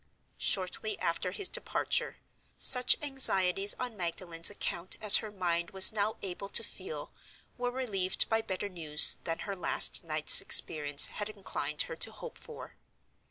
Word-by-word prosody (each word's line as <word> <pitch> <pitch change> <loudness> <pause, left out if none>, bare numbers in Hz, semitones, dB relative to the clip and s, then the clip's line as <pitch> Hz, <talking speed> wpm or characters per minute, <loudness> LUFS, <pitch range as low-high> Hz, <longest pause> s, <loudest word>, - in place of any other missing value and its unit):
Shortly 195 +3 -2
after 170 +2 -4
his 370 - 0
departure, - - -3 0.4
such 250 -1 +3
anxieties 200 -8 +1
on 250 -3 -7
Magdalen's 170 -2 -4
account 185 -3 -6
as 210 -1 +9
her 215 - -7
mind 175 -4 -5
was 190 -1 +7
now 215 0 -3
able 195 +1 -7
to - - +2
feel - - -10 0.4
were 245 0 -5
relieved 210 -8 -3
by 225 0 -2
better 195 -1 -7
news 160 -5 +1
than 165 0 -5
her 200 - -7
last 180 - +1
night's 155 -2 +2
experience 145 -2 +5
had 210 0 -5
inclined 210 - -4
her - - -10
to - - +2
hope 485 - -13
for. 465 - -14
195 Hz, 150 wpm, -28 LUFS, 170-220 Hz, 0.4 s, as